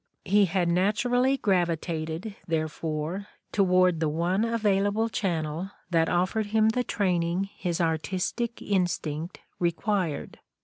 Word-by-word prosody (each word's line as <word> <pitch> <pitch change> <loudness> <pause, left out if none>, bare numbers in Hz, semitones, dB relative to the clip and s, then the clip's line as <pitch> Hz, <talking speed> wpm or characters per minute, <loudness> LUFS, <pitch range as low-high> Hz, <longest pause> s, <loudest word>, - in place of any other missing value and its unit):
' - - -48
' - - -48
He 205 -1 +7
had 180 -1 0
naturally 245 +9 +2
gravi 180 -7 +2
tated, 160 +5 -4
therefore, 160 +3 -2 0.2
toward 185 -3 +3
the 160 -1 +1
one 175 +6 +1
available 215 -1 +1
channel 170 -3 -2 0.2
that 165 -1 +3
offered 185 +5 +1
him 220 +1 +3
the 250 +3 +1
training 185 -2 0
his 175 -3 -2
artistic 180 +8 -1
instinct 175 -4 -1 0.2
required. 175 -1 -1
180 Hz, 125 wpm, -27 LUFS, 165-205 Hz, 0.2 s, He